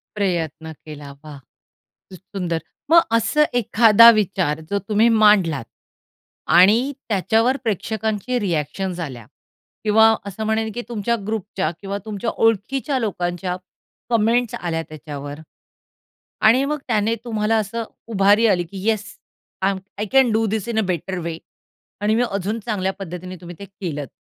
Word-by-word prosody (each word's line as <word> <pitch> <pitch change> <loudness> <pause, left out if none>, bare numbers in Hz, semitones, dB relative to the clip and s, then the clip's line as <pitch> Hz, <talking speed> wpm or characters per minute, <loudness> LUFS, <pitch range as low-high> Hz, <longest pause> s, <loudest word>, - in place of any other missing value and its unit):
प्रयत्न 160 -5 -2
केला. 145 -2 -9
वाह! 150 -2 -10 0.7
खूप 185 - -11 0.2
सुंदर. 170 -3 -1 0.3
मग 335 0 +8 0.2
असं 265 +7 +2
एखादा 230 -1 +7
विचार, 180 -6 -1
जो 200 0 0
तुम्ही 215 +2 +4 0.2
मांडलात 170 - +4 0.9
आणि 205 +6 +6 0.3
त्याच्यावर 225 +6 +2
प्रेक्षकांचे 220 +3 -2
रिॲक्शन्स 175 0 -2
आल्या 130 -8 -6 0.6
किंवा 220 +1 +5
असं 200 +3 -5
म्हणेन, 220 0 0
की 240 - -5
तुमच्या 235 +1 -1
ग्रुपच्या 200 -6 -2
किंवा 200 0 -4
तुमच्या 215 +1 -3 0.2
ओळखीच्या 260 +6 0
लोकांच्या 180 -4 -2 0.5
कॉमेंट्स 230 +1 +2
आल्या 165 -2 -3
त्याच्यावर. 145 -1 -8 1.0
आणि 235 +5 +5
मग 300 +1 -1
त्याने 220 0 +1
तुम्हाला 220 -1 0
असं 220 +2 -2 0.3
उभारी 205 +3 +4
आली, 180 -4 +2
की 190 +4 -7
"yes, 215 -1 0 0.6
I 195 - +3
am 195 - -4 0.2
I 210 - -1
can 265 -4 +5
do 220 +1 +2
this 215 +1 -2
in 220 -1 0
a - - +3
better 185 +1 -3
way" 165 -1 -4 0.6
आणि 215 +1 +2
मी 245 - +2
अजून 200 +3 -2
चांगल्या 190 -4 -1
पद्धतीने 185 0 -7
तुम्ही 175 0 -9
ते 200 - -7
केलंत. 165 - -6
205 Hz, 140 wpm, -21 LUFS, 175-225 Hz, 1.0 s, मग